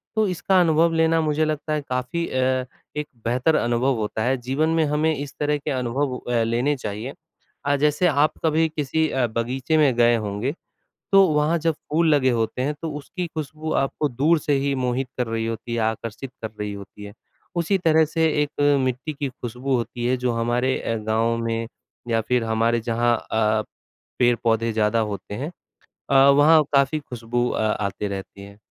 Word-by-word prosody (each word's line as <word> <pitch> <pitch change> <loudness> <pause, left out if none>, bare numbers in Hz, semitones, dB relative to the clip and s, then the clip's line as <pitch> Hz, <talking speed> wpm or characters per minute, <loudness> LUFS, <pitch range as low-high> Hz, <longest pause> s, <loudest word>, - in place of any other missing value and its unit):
तो 220 -2 +2
इसका 185 +1 +2
अनुभव 165 0 +3
लेना 160 0 +3
मुझे 155 0 +1
लगता 155 0 -2
है 150 - 0
काफ़ी 130 +7 -2
अ, 130 0 0 0.3
एक 150 - -2 0.2
बेहतर 130 +7 +2
अनुभव 120 +3 +1
होता 110 +1 -2
है, 130 +3 +1
जीवन 135 +6 -1
में 165 -1 +2
हमें 150 +2 +1
इस 145 0 -6
तरह 150 0 +1
के 140 - -4
अनुभव 130 +1 -1
अ, 120 -2 -1
लेने 120 +6 +1
चाहिए। 110 +2 -5 0.5
अ, 145 0 +3
जैसे 150 +5 +2
आप 150 -1 +2
कभी 160 +1 +3
अ, - - -13
किसी 155 +2 0 0.3
बगीचे 130 +6 0
में 145 -4 +4
गए 120 0 +4
होंगे, 110 +4 -2 0.6
तो 195 -1 +7
वहाँ 150 +3 +2
जब 165 0 +1
फूल 160 +2 0
लगे 130 -2 +3
होते 115 +1 -1
हैं 145 +3 0
तो 165 -2 -3
उसकी 175 +4 -5
ख़ुशबू 155 0 -5
आपको 145 +2 -1
दूर 150 +6 +2
से 150 - 0
ही 140 - +1
मोहित 125 +1 -1
कर 125 -2 -1
रही 115 0 -2
होती 115 +1 -4
है, - - -1
आकर्षित 110 +3 -3
कर 110 - -4
रही 105 0 -3
होती 100 +1 -10
है। 100 0 -9 0.4
उसी 170 +4 +2
तरह 160 -3 +4
से 160 +1 0 0.2
एक 145 0 -5 0.2
मिट्टी 130 +4 -2
की 140 -1 -3
ख़ुशबू 125 +2 -3
होती 120 0 -4
है 130 +1 +2
जो 125 0 0
हमारे 120 +3 0
अ, 115 - -2
गाँव 110 +2 0
में 115 0 -2 0.4
या 115 -1 +1
फिर 125 +1 0
हमारे 115 +1 +1
जहाँ 120 +1 +1 0.2
अ, 110 -1 +2 0.6
पेड़-पौधे 115 -2 +2
ज़्यादा 110 +1 +2
होते 100 +1 -7
हैं 140 +9 -4 0.6
अ, 140 - +3 0.2
वहाँ 155 +3 +6
काफी 140 +2 +3
ख़ुशबू 120 -3 -2
अ, - - -2
आते 105 -1 -1
रहती 100 0 -7
है। 100 +1 -13
130 Hz, 185 wpm, -23 LUFS, 115-155 Hz, 0.6 s, तो